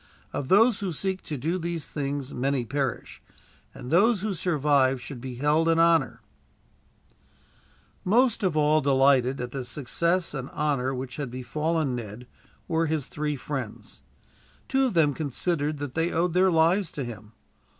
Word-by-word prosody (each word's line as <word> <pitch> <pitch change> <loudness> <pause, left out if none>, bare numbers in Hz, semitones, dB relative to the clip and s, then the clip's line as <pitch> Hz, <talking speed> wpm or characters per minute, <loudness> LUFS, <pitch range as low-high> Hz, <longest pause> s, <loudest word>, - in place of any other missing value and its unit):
Of 135 - -3
those 220 - +5
who 195 -4 -2
seek 190 +4 -2
to 150 - -4
do 165 +8 -1
these 170 -3 -3
things 140 -2 -4
many 130 0 -1
perish, 135 +2 -3 0.5
and 125 - -9
those 200 +4 +4
who 215 -2 -1
survive 145 -6 +2
should 125 0 -9
be 130 -1 -6
held 150 +5 +2
in 165 - +3
honor" 165 -3 +3 1.8
Most 235 +4 +3
of 180 -6 0
all 155 +1 +4
delighted, 135 -1 +3
at 125 -1 -4
the 135 -1 -4
success 170 +8 -1
and 135 -2 -5
honor 140 -4 0
which 125 0 -6
had 145 -4 -4
befallen 150 +4 -1
Ned, 115 0 -6 0.4
were 165 -1 +1
his 155 -3 -1
three 150 +1 -3
friends. 130 -4 -6 0.7
Two 270 0 +2
of 240 -8 -2
them 150 -4 +4
considered 150 +1 -2
that 145 -2 -5
they 165 +2 0
owed 170 +1 0
their 185 +1 +4
lives 170 +2 +3
to 140 - -3
him. 110 -2 -9
150 Hz, 160 wpm, -26 LUFS, 130-170 Hz, 1.8 s, those